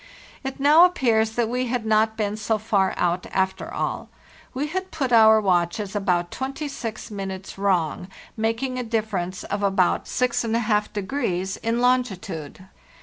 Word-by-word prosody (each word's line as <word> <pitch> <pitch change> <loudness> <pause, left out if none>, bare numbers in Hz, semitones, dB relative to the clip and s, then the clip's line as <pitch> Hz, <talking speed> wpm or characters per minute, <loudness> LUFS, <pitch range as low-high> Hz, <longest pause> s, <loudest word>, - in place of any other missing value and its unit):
It 270 0 -5
now 300 +5 +7
appears 225 -11 +2
that 235 -2 +1
we 250 +2 -1
had 240 -2 -2
not 220 0 +2
been 210 -1 -1
so 215 +1 0
far 200 -3 +1
out, 175 0 0
after 190 0 -1
all. - - -3 0.4
We 270 +3 -2
had 375 +5 -4
put 275 -6 -2
our 220 -1 +7
watches 190 +1 0
about 180 -4 0
26 265 -5 -5
minutes 195 -2 -6
wrong, 180 -3 0 0.3
making 230 +4 -1
a_ 245 -3 -4
difference 195 -5 -2
of 205 0 -3
about 195 -2 +2
64° 215 -4 -1
in 230 +1 0
longitude. 195 - -1
220 Hz, 140 wpm, -24 LUFS, 190-245 Hz, 0.4 s, now